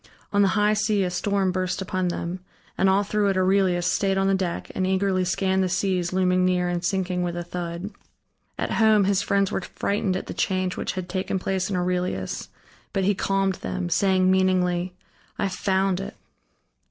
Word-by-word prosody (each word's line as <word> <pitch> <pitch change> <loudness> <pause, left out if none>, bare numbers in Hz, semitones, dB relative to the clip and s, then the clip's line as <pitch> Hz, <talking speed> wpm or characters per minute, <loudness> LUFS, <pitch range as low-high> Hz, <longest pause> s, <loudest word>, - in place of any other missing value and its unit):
On 205 - +4
the 200 - +5
high 210 0 +3
sea 215 -1 +1
a 180 - -1
storm 195 +1 0
burst 185 0 -2
upon 185 -1 -1
them, 175 +1 -3 0.4
and 190 - +3
all 195 +2 +3
through 205 0 +1
it 195 - 0
Aurelius 185 -2 +2
stayed 195 +1 +1
on 195 - +2
the 195 - +3
deck 185 -3 -2
and 185 - -1
eagerly 190 0 +1
scanned 190 +1 +1
the 185 - +1
seas 180 -1 0
looming 185 0 +2
near 180 -1 +2
and 175 0 -2
sinking 185 -1 -1
with 175 -1 -2
a 175 - -3
thud. 175 +2 -5 0.7
At - - -2
home 220 -2 +4
his 195 0 +2
friends 200 -1 +1
were - - -1
frightened 195 0 -1
at - - -6
the - - -6
change 185 -1 -1
which - - -3
had 185 -2 -5
taken 185 +1 -2
place 190 0 -1
in 195 - -1
Aurelius, 180 - -2 0.4
but 195 - 0
he 200 +2 +3
calmed 195 0 0
them, 185 -1 -3
saying 185 +1 +3
meaningly: 180 -1 +1 0.4
"I - - -1
have 195 -2 -1
found 190 0 +1
it." 195 - -6
185 Hz, 195 wpm, -24 LUFS, 180-195 Hz, 0.7 s, the